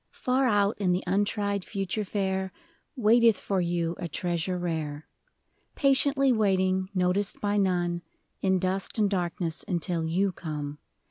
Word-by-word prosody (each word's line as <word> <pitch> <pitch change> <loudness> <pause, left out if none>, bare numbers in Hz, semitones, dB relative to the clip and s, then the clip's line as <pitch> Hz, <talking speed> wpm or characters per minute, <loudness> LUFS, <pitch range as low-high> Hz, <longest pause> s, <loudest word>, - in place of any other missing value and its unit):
AR 255 0 +3
out 205 -2 +2
in 185 -3 +2
the 180 - -1
untried 200 +1 0
future 195 +2 -3
fair 190 -1 -2 0.4
Waiteth 230 -3 +4
for 195 -2 -1
you 170 -1 -1
a 175 - -3
treasure 175 +2 -2
rare; 160 -4 -3 0.7
Patiently 275 -1 +3
waiting, 190 -4 +1
noticed 185 +2 +1
by 205 0 0
none, 175 -3 +1 0.4
In 190 -1 +2
dust 185 +3 -1
and 210 -2 +3
darkness 175 -3 -1
until 170 -1 -1
you 185 +5 +1
come. 150 -4 -6
190 Hz, 135 wpm, -27 LUFS, 175-205 Hz, 0.7 s, Waiteth